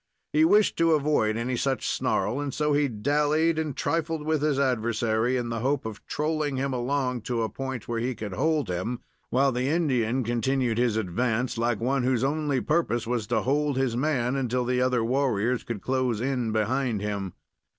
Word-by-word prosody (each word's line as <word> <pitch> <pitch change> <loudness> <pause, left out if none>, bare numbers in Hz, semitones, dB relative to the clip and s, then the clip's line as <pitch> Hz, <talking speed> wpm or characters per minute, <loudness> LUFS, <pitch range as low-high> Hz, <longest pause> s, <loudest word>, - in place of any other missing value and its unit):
He 155 +1 +4
wished 205 +5 +4
to 165 -1 +4
avoid 140 -8 +1
any 125 +2 -1
such 135 +1 -1
snarl, 105 +8 0
and 145 -1 -3
so 150 +2 0
he 145 0 +3
dallied 150 +7 +1
and 155 -4 -3
trifled 165 -2 -1
with 155 -1 +1
his 150 -2 +1
adversary 120 -1 +1
in 120 -1 -2
the 115 -1 -2
hope 135 +2 0
of 110 -2 -7
trolling 150 -1 -1
him 135 0 -1
along 125 0 -1
to 115 -2 0
a 110 - -1
point 130 +1 -5
where 115 -1 -2
he 125 +2 -2
could 105 -2 -6
hold 155 +5 +1
him, 95 +7 -3 0.3
while 135 +2 +3
the 125 +1 -1
Indian 130 -6 +1
continued 120 0 0
his 120 -3 +2
advance 115 +5 -1
like 115 -1 0
one 130 +3 +1
whose 125 -1 +1
only 145 -1 0
purpose 150 -6 0
was 115 -2 -2
to 120 - +1
hold 145 +1 +1
his 130 -3 0
man 130 -2 0
until 125 -2 0
the 125 0 +1
other 125 -2 +2
warriors 125 -2 +1
could 110 -5 -5
close 130 -4 0
in 125 -2 -1
behind 110 +1 0
him. 100 -3 -3
125 Hz, 190 wpm, -26 LUFS, 115-145 Hz, 0.3 s, He